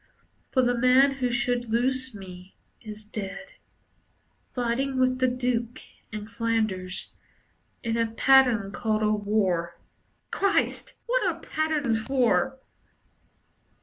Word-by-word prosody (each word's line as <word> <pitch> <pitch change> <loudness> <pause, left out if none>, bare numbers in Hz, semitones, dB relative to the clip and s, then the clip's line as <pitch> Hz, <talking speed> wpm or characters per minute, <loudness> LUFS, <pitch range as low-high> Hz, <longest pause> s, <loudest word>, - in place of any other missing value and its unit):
For 260 - +2
the 245 0 +2
man 255 +3 +5
who 250 -1 +1
should 240 -1 -1
loose 260 +1 0
me 185 -1 -11 0.3
is 215 -1 -10
dead, 210 +5 -7 1.0
Fighting 255 +2 -1
with 255 0 +2
the 255 - +3
Duke 245 -1 -1 0.3
in 210 -1 -6
Flanders, 220 -5 -2 0.7
In 230 -1 -1
a 230 -1 +1
pattern 245 -4 +4
called 215 -1 -1
a 215 - +3
war. 195 -5 0 0.5
Christ! 395 0 0
What - - +1
are - - -1
patterns 300 -8 -1
for? 265 +1 +1
235 Hz, 115 wpm, -26 LUFS, 215-260 Hz, 1.0 s, man